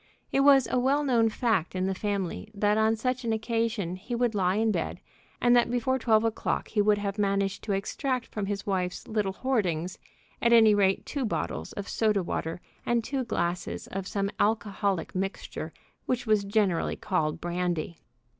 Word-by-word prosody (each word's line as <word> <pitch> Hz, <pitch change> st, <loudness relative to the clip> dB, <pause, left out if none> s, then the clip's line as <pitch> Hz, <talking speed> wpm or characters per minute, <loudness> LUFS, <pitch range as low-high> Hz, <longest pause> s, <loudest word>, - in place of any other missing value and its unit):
It -, -, +2 dB
was 275 Hz, -2 st, +6 dB
a 255 Hz, -, +2 dB
well 275 Hz, +4 st, +2 dB
known 235 Hz, -5 st, +3 dB
fact 215 Hz, -7 st, 0 dB
in 185 Hz, 0 st, 0 dB
the 190 Hz, -, 0 dB
family 200 Hz, 0 st, -3 dB
that 205 Hz, +1 st, +2 dB
on 220 Hz, +1 st, +3 dB
such 250 Hz, +3 st, -2 dB
an 230 Hz, -, -1 dB
occasion 220 Hz, -5 st, -1 dB
he 240 Hz, +6 st, -5 dB
would 240 Hz, -1 st, +1 dB
lie 185 Hz, -2 st, +1 dB
in 220 Hz, +1 st, +2 dB
bed, -, -, -2 dB, 0.4 s
and 245 Hz, 0 st, +4 dB
that 240 Hz, -1 st, +4 dB
before 245 Hz, +2 st, 0 dB
twelve 220 Hz, -2 st, +3 dB
o'clock 225 Hz, -1 st, -1 dB
he 210 Hz, -, +2 dB
would 210 Hz, 0 st, +4 dB
have 205 Hz, 0 st, -3 dB
managed 200 Hz, -1 st, 0 dB
to 215 Hz, -, -2 dB
extract 250 Hz, +5 st, -1 dB
from 205 Hz, -2 st, -4 dB
his 200 Hz, 0 st, -3 dB
wife's 185 Hz, -2 st, -2 dB
little 210 Hz, -3 st, -1 dB
hoardings 185 Hz, -9 st, -1 dB, 0.4 s
at 235 Hz, 0 st, +4 dB
any 220 Hz, -2 st, +7 dB
rate 195 Hz, -2 st, +2 dB
two 280 Hz, -2 st, -3 dB
bottles 85 Hz, -, -3 dB
of 205 Hz, -, -6 dB
soda 210 Hz, -4 st, +1 dB
water 165 Hz, 0 st, -3 dB, 0.2 s
and 235 Hz, -1 st, +1 dB
two 265 Hz, +2 st, -2 dB
glasses 175 Hz, -6 st, -2 dB
of 190 Hz, -1 st, -4 dB
some 200 Hz, 0 st, -1 dB
alcoholic 205 Hz, -4 st, 0 dB
mixture 195 Hz, +1 st, -4 dB, 0.4 s
which 250 Hz, -1 st, -1 dB
was 215 Hz, -2 st, +2 dB
generally 200 Hz, -4 st, +1 dB
called 155 Hz, -6 st, -1 dB
brandy. 175 Hz, -1 st, -2 dB
210 Hz, 180 wpm, -28 LUFS, 190-230 Hz, 0.4 s, any